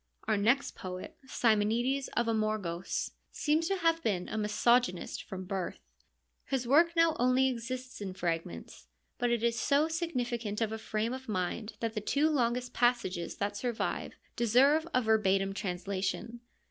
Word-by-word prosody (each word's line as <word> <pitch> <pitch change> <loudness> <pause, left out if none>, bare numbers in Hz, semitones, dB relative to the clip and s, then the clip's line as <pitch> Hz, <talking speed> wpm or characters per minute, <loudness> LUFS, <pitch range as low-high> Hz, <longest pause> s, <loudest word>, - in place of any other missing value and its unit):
Our 220 - +3
next 235 +7 +2
poet, 185 0 -7
Simonides 240 +4 +2
of 235 - +3
Amorgos, 215 -6 -1 0.2
seems 310 +2 +1
to 390 - +1
have 330 -2 +2
been 185 - -1
a - - -4
misogynist 215 -1 +1
from 185 -1 -7
birth. 185 -1 -3 0.7
His 255 -3 -2
work 335 +6 +5
now 330 -1 +4
only 255 +2 +4
exists 255 0 -4
in 190 -2 -5
fragments, 165 - -4 0.3
but 245 - +1
it 235 -1 0
is 235 -1 +1
so 290 +2 +3
significant 245 -10 -2
of 225 -2 0
a 220 - -4
frame 220 +2 -2
of 260 -2 -7
mind 210 +3 -2
that 225 -1 -1
the 215 - -2
two 290 +8 +2
longest 250 -2 0
passages 240 -8 +1
that 205 0 -2
survive 240 0 -2 0.2
deserve 270 +7 +4
a 255 - +2
verbatim 195 -3 +2
translation. 195 +4 -3
230 Hz, 150 wpm, -31 LUFS, 200-255 Hz, 0.7 s, work